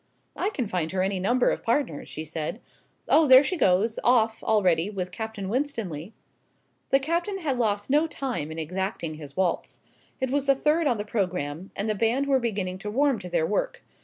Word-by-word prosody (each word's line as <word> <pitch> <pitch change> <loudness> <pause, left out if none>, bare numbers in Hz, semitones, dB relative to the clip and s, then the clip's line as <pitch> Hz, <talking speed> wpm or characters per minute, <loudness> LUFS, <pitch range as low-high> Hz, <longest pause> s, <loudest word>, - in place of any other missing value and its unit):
"I 395 - 0
can 275 - -2
find 180 -5 -2
her 185 -1 +1
any 190 0 -1
number 240 +7 +2
of - - -3
partners," 230 - -1
she 155 - -5
said. 160 +6 -4 0.5
"Oh, 315 0 +5
there 260 +1 +9
she 365 - -1
goes 215 - +2
off 225 -2 +3
already 185 -4 +2
with 185 -3 -4
Captain 220 -3 -5
Winstanley." 215 - -3 0.7
The 270 - +5
Captain 340 +7 -1
had 285 -9 -2
lost 205 0 0
no 300 +3 +4
time 250 - -4
in 160 - -7
exacting 175 0 -3
his 145 -2 -11
waltz. 185 -2 -1 0.4
It 260 -1 -1
was 280 0 0
the 275 - +5
third 305 +3 +2
on 245 -4 +2
the 205 - -4
programme, 180 -5 -2
and 200 - -2
the 215 - +1
band 230 +6 +1
were 275 -1 +3
beginning 195 -6 -2
to 210 - -5
warm 270 +1 +2
to 180 - -8
their 170 -2 +1
work. 210 - -2
215 Hz, 195 wpm, -26 LUFS, 185-270 Hz, 0.7 s, there